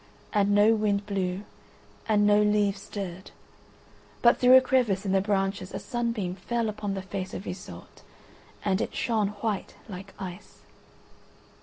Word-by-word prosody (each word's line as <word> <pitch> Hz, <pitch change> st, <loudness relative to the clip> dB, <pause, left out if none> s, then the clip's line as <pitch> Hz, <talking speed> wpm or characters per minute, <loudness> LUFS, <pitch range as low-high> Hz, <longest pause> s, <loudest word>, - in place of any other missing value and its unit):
And 205 Hz, -1 st, +3 dB
no 210 Hz, +2 st, +6 dB
wind 205 Hz, -2 st, 0 dB
blew, 190 Hz, -1 st, -2 dB, 0.7 s
and 205 Hz, -1 st, +4 dB
no 205 Hz, 0 st, +5 dB
leaves 210 Hz, -1 st, +2 dB
stirred, 190 Hz, -3 st, -6 dB, 0.9 s
but 235 Hz, 0 st, +6 dB
through 255 Hz, +1 st, +8 dB
a -, -, +7 dB
crevice 240 Hz, -7 st, +1 dB
in 190 Hz, -, 0 dB
the 195 Hz, 0 st, +3 dB
branches 195 Hz, -1 st, -1 dB
a -, -, -3 dB
sunbeam 230 Hz, -7 st, -2 dB
fell 225 Hz, +4 st, -2 dB
upon 205 Hz, -1 st, -3 dB
the 190 Hz, -, -4 dB
face 190 Hz, -1 st, -5 dB
of 190 Hz, -, -6 dB
Iseult 180 Hz, 0 st, -9 dB, 0.6 s
and 195 Hz, -1 st, +1 dB
it -, -, -3 dB
shone 220 Hz, -4 st, +1 dB, 0.2 s
white 215 Hz, -4 st, -2 dB
like 195 Hz, -1 st, -9 dB
ice. 185 Hz, 0 st, -9 dB
205 Hz, 150 wpm, -27 LUFS, 195-215 Hz, 0.9 s, through